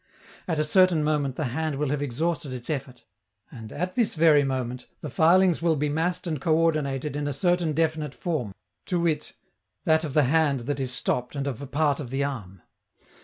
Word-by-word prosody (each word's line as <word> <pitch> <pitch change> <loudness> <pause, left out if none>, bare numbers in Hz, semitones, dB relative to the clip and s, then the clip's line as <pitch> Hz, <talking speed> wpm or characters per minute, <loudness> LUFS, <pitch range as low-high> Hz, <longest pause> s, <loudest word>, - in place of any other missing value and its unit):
At 165 -3 -1
a 155 - +2
certain 175 0 +4
moment 145 -3 0
the 155 - -2
hand 155 0 -1
will 145 0 -1
have 145 -1 -1
exhausted 145 +3 -2
its 125 +3 -4
effort, 135 -3 -5 0.5
and, 110 -4 -10
at 180 +4 -3
this 235 -6 +1
very 155 -3 +5
moment, 130 -2 -3
the - - -6
filings 175 0 +4
will 165 -1 +2
be 150 0 0
massed 165 +5 -1
and 155 -5 -3
coördinated 155 -4 +1
in 145 0 -2
a 145 - -1
certain 175 +1 +1
definite 155 -3 -1
form, 155 - -2 0.4
to 180 - 0
wit, 160 -3 -1 0.5
that 160 0 +3
of 150 -4 -5
the 150 - +5
hand 140 -1 +2
that 140 +3 -3
is 130 -2 0
stopped 125 0 -1
and 140 -1 -2
of 140 -3 -4
a 140 - -6
part 145 0 +1
of 135 -5 -6
the 135 +2 -1
arm. 105 -10 -5
150 Hz, 200 wpm, -26 LUFS, 135-160 Hz, 0.5 s, very